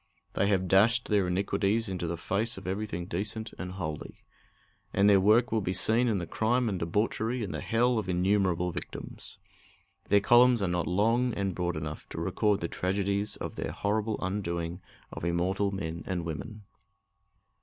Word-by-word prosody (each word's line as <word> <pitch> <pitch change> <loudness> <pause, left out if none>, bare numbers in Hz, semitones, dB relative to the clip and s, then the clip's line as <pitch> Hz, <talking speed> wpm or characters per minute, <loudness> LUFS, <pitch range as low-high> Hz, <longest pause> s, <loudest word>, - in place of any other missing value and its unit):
They 100 - +1
have 95 -2 +1
dashed 115 +6 +4
their 100 -4 +2
iniquities 100 +4 0
into 90 -3 -3
the 85 +1 -3
face 105 +7 0
of 95 - -9
everything 95 -2 -3
decent 105 +5 -3
and 90 0 -5
holy. 80 -5 -6 0.7
And 100 +1 +4
their 100 -1 +6
work 110 +5 +4
will 110 -1 +1
be 90 -1 -1
seen 110 +6 +2
in 110 -4 +1
the 85 - -3
crime 120 +6 +1
and 95 -3 -2
debauchery 110 +7 -1
and 100 - -4
the - - -4
hell 120 +1 +2
of 105 - -5
innumerable 90 -1 +1
victims. - - -8 0.7
Their 100 - +6
columns 120 +1 +5
are - - +1
not 90 -2 -1
long 115 +6 +2
and 95 -1 -1
broad 90 -1 -2
enough 75 0 -6
to - - -6
record 105 -2 +1
the 85 - -1
tragedies 100 +3 -1
of - - -6
their - - -3
horrible 105 +1 -1
undoing 85 -2 -3 0.3
of - - -8
immortal 90 +4 0
men 85 -4 -4
and 90 -3 -2
women. 105 +7 -6
100 Hz, 175 wpm, -29 LUFS, 90-110 Hz, 0.7 s, their